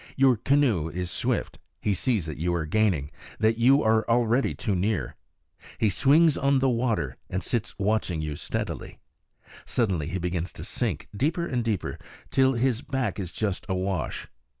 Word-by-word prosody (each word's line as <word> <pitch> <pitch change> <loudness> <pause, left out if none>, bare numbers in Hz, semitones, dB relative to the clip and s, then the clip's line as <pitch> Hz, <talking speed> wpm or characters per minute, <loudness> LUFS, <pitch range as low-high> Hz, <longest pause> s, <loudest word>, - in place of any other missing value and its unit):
Your 135 -2 +5
canoe 120 - +2
is 90 +2 -4
swift; - - -1 0.2
he 105 - 0
sees 105 -1 0
that 75 -3 -6
you 85 +2 0
are 80 -2 -1
gaining, 80 -5 +1 0.3
that 110 +1 +2
you 135 +5 +5
are 110 0 +3
already 120 +2 +2
too 105 - -1
near. 95 - -1 0.6
He 110 -3 +2
swings 150 - +4
on 140 0 +2
the 135 0 +3
water, 115 - -1
and 95 - -2
sits 120 -1 -2
watching 100 -4 0
you 75 -1 -3
steadily. - - -4 0.7
Suddenly 95 -11 0
he 85 +3 -2
begins 90 0 -2
to - - -8
sink, - - -3
deeper 160 - 0
and 125 -7 -1
deeper, 110 -6 -2 0.3
till 130 0 +4
his 125 0 +1
back 135 -6 -2
is 90 -3 -4
just 100 -4 -2
awash. 95 -2 -2
110 Hz, 165 wpm, -26 LUFS, 90-125 Hz, 0.7 s, Your